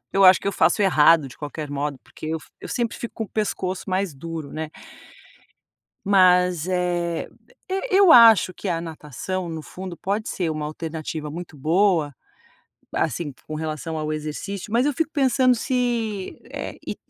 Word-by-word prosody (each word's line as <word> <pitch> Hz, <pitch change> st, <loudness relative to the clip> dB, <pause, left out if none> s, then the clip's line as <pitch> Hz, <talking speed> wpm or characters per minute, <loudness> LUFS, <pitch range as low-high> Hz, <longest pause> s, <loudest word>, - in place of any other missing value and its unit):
eu 195 Hz, 0 st, +4 dB
acho 185 Hz, -1 st, +8 dB
que 200 Hz, -, -2 dB
eu -, -, -1 dB
faço 175 Hz, -, +3 dB
errado 165 Hz, -6 st, +5 dB
de -, -, -14 dB
qualquer 150 Hz, +1 st, -6 dB
modo, 145 Hz, -1 st, -3 dB
porque -, -, -10 dB
eu 160 Hz, +1 st, -1 dB
f -, -, -17 dB
eu -, -, -8 dB
sempre 235 Hz, -2 st, -2 dB
fico 235 Hz, -, -7 dB
com 225 Hz, -, -3 dB
o -, -, -13 dB
pescoço 190 Hz, -3 st, -2 dB
mais 185 Hz, -4 st, -1 dB
duro, 160 Hz, 0 st, -6 dB
né. 155 Hz, -1 st, -5 dB, 1.4 s
Mas, 180 Hz, -3 st, +4 dB
eh, 175 Hz, -2 st, -1 dB, 0.4 s
eu 385 Hz, +1 st, -1 dB
eu 390 Hz, -3 st, +6 dB
acho 225 Hz, -6 st, +8 dB
que 195 Hz, -, -5 dB
a 165 Hz, -2 st, 0 dB
natação 165 Hz, +3 st, -5 dB
no 160 Hz, -1 st, -5 dB
fundo 180 Hz, +3 st, -8 dB
pode 205 Hz, +3 st, -2 dB
ser 175 Hz, -4 st, -1 dB
uma 155 Hz, -1 st, -3 dB
alternativa 155 Hz, -1 st, -5 dB
muito 165 Hz, 0 st, -8 dB
boa. 160 Hz, 0 st, +2 dB, 0.8 s
Assim 160 Hz, -1 st, -1 dB
com 155 Hz, -, -7 dB
relação 155 Hz, 0 st, -4 dB
ao 155 Hz, 0 st, -2 dB
exercício, 155 Hz, +7 st, -5 dB
mas 240 Hz, +4 st, +3 dB
eu 295 Hz, -, +1 dB
fico 320 Hz, +1 st, -1 dB
pensando 260 Hz, -3 st, +3 dB
se, 235 Hz, -5 st, -2 dB
eh, -, -, -6 dB
e -, -, -3 dB
175 Hz, 170 wpm, -23 LUFS, 155-205 Hz, 1.4 s, acho